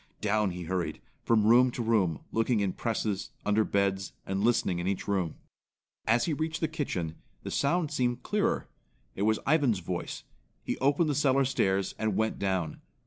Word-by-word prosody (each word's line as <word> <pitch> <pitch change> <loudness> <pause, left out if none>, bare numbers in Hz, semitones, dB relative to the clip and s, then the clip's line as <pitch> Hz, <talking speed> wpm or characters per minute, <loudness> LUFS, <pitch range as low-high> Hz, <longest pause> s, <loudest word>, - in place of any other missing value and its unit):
Down 105 -1 +1
he 90 0 -5
hurried, 90 0 -2 0.2
from 110 -3 +3
room 125 +3 +6
to 120 -1 -4
room, 100 -9 +1
looking 115 0 +1
in 100 -3 0
presses, 110 -4 -2 0.2
under 105 +1 +3
beds, 100 -2 0
and 95 +1 -1
listening 110 -6 +2
in 85 - -2
each 100 -1 -2
room. 95 -6 0 0.7
As 115 +2 +3
he 165 - 0
reached 160 +1 -2
the 160 - +1
kitchen, 95 - -3 0.3
the - - -5
sound 160 +2 +1
seemed 125 -3 0
clearer. 210 -1 0 0.5
It - - -6
was 110 - +2
Ivan's 140 -7 +3
voice. 90 0 -4 0.4
He - - -2
opened 145 +4 +3
the 150 - +1
cellar 135 -1 +3
stairs 95 -7 +1
and 110 -3 0
went 110 0 0
down. 95 -5 -1
110 Hz, 175 wpm, -29 LUFS, 95-130 Hz, 0.7 s, room